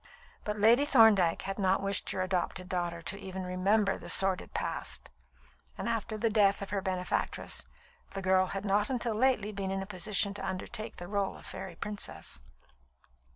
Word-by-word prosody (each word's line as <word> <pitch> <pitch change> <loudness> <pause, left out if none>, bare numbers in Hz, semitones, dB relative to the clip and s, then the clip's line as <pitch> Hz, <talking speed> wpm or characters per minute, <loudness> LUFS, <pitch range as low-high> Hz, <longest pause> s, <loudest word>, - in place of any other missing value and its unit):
But 210 0 -3
Lady 230 +6 +5
Thorndyke 220 - +5
had 195 +1 -4
not 190 -1 +3
wished 195 -1 0
her 185 - -1
adopted 185 0 -2
daughter 175 -2 -2
even 190 -1 -6
to - - -6
remember 195 +3 +2
the - - -9
sordid 190 -1 +3
past; - - -3 0.7
and - - -4
after 225 -2 -2
the 225 +2 +1
death 200 -2 +3
of 195 - -8
her 200 -1 0
benefactress, 185 -1 -1 0.5
the 195 - -3
girl 185 0 +3
had 195 +2 -4
not 205 +1 +2
until 240 -3 -1
lately 215 -2 +2
been 195 -2 -3
in 195 0 -2
a - - -7
position 200 +1 0
to 205 - -6
undertake 215 +4 -4
the 175 - -7
rôle 200 +1 -1
of - - -14
fairy 190 -3 -7
princess. 205 - -5
195 Hz, 175 wpm, -31 LUFS, 185-210 Hz, 0.7 s, Lady